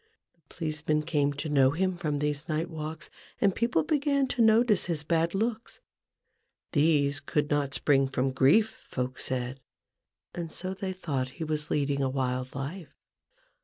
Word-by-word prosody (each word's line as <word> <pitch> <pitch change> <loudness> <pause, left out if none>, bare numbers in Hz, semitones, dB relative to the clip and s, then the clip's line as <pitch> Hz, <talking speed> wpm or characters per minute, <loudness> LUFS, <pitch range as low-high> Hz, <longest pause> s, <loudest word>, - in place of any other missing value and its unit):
The 170 - -39
policemen 155 -1 -1
came 145 -3 +1
to 145 +2 -5
know 135 -3 +4
him 185 +6 0
from 155 -4 -2
these 150 +2 -2
night 160 +3 -1
walks, 155 0 -6 0.3
and 200 -2 +3
people 230 -8 +1
began 285 -2 +1
to 240 - 0
notice 220 -2 +4
his 165 -4 -2
bad 165 +2 +1
looks: 225 +3 -2 0.9
these 145 -2 +3
could 150 +1 -1
not 140 -2 +1
spring 135 +1 +3
from 130 0 0
grief, 140 +12 +3
folk 125 0 -3
said, 130 +1 -2 0.7
and 170 -2 -5
so 185 +3 -3
they 190 0 -4
thought 140 -8 -3
he 165 - -3
was 150 -1 -2
leading 140 -1 0
a 135 - +1
wild 130 -1 -2
life. 150 +6 -6
150 Hz, 160 wpm, -28 LUFS, 140-180 Hz, 0.9 s, know